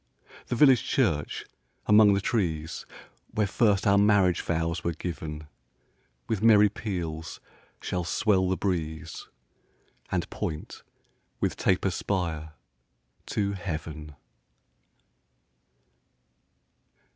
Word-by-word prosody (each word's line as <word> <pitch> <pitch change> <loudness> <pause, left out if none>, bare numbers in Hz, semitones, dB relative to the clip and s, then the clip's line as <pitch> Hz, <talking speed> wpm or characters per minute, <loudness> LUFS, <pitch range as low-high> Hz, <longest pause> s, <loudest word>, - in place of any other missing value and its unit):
The - - -1
village 135 -2 +6
church, 95 - 0 0.4
among 105 -1 +6
the 100 - 0
trees, 80 -8 -2 0.5
Where 105 - +2
first 100 0 +2
our 100 -1 +5
marriage 100 -4 +4
vows 85 +1 -2
were 85 - -1
giv'n, 80 -3 -6 0.8
With 110 -3 -1
merry 105 -2 +6
peals 85 -7 -5 0.4
shall 90 -1 -3
swell 95 +1 +2
the 95 - 0
breeze, 80 -4 -3 0.8
And - - -1
point 75 0 -5 0.6
with - - 0
taper 95 +1 +1
spire 85 -5 -3 0.7
to 100 -1 -1
heav'n. 80 -5 -6
90 Hz, 95 wpm, -27 LUFS, 80-105 Hz, 0.8 s, village